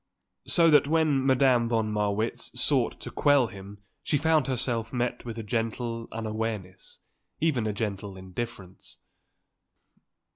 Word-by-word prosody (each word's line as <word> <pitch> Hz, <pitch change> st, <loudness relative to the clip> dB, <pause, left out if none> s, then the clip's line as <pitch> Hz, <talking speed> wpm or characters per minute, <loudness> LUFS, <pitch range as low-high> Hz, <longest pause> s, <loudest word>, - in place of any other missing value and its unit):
So 165 Hz, -2 st, +4 dB
that 145 Hz, -1 st, +5 dB
when 155 Hz, -3 st, +2 dB
Madame 130 Hz, -3 st, +4 dB
von 110 Hz, -2 st, 0 dB
Marwitz 105 Hz, +1 st, -2 dB
sought -, -, +2 dB
to -, -, -7 dB
quell 145 Hz, -3 st, +4 dB
him 100 Hz, -1 st, -10 dB, 0.2 s
she 145 Hz, -, 0 dB
found 155 Hz, -2 st, +2 dB
herself 120 Hz, -3 st, -2 dB
met 125 Hz, -1 st, -2 dB
with 115 Hz, -1 st, -6 dB
a 115 Hz, -, -4 dB
gentle 115 Hz, +1 st, -3 dB
unawareness, 110 Hz, -4 st, -5 dB, 0.4 s
even 140 Hz, -9 st, +1 dB
a -, -, 0 dB
gentle 100 Hz, -2 st, -4 dB
indifference. 95 Hz, 0 st, -7 dB
115 Hz, 130 wpm, -27 LUFS, 105-130 Hz, 0.4 s, that